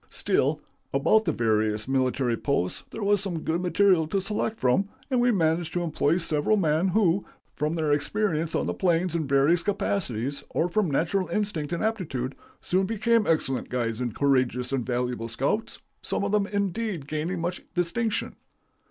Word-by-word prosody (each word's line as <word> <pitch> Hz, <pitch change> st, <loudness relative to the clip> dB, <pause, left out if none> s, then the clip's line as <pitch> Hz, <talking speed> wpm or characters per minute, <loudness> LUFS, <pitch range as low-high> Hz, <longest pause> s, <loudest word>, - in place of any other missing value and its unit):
Still, -, -, +1 dB, 0.4 s
about 220 Hz, 0 st, +3 dB
the 165 Hz, -, +2 dB
various 110 Hz, -3 st, 0 dB
military 130 Hz, -2 st, +1 dB
posts 110 Hz, -8 st, -1 dB
there 225 Hz, -, -6 dB
was 205 Hz, -1 st, +3 dB
some 180 Hz, -5 st, -3 dB
good 165 Hz, +2 st, -1 dB
material 180 Hz, -2 st, +3 dB
to 195 Hz, +5 st, 0 dB
select 215 Hz, +3 st, -2 dB
from, 160 Hz, +11 st, +2 dB, 0.2 s
and 250 Hz, -2 st, +3 dB
we 245 Hz, -, +4 dB
managed 165 Hz, -4 st, +1 dB
to 175 Hz, -, 0 dB
employ 160 Hz, 0 st, +1 dB
several 165 Hz, +4 st, +1 dB
men, 160 Hz, -1 st, +2 dB
who, 190 Hz, -1 st, +2 dB, 0.3 s
from 150 Hz, +2 st, -1 dB
their 155 Hz, -3 st, 0 dB
experience 165 Hz, +1 st, 0 dB
on -, -, 0 dB
the -, -, -1 dB
plains 175 Hz, -1 st, +1 dB
in 160 Hz, -4 st, -1 dB
various 140 Hz, +5 st, +3 dB
capacities, 145 Hz, -, -1 dB
or 175 Hz, -, 0 dB
from 195 Hz, -1 st, +1 dB
natural 175 Hz, +6 st, 0 dB
instinct 200 Hz, -8 st, -2 dB
and 170 Hz, -, -2 dB
aptitude, 150 Hz, -, -2 dB, 0.3 s
soon 190 Hz, +1 st, +1 dB
became 225 Hz, +1 st, +2 dB
excellent 135 Hz, -5 st, 0 dB
guides 120 Hz, -2 st, -2 dB
and 120 Hz, -4 st, -3 dB
courageous 130 Hz, -3 st, +1 dB
and 130 Hz, -3 st, -1 dB
valuable 125 Hz, -2 st, -1 dB
scouts, 135 Hz, -, -1 dB, 0.2 s
some -, -, -2 dB
of 200 Hz, -, -1 dB
them, 210 Hz, -1 st, +2 dB
indeed, 200 Hz, -5 st, -2 dB
gaining 155 Hz, +4 st, -2 dB
much 175 Hz, +2 st, -3 dB
distinction. 205 Hz, +6 st, -1 dB
165 Hz, 170 wpm, -26 LUFS, 135-200 Hz, 0.4 s, we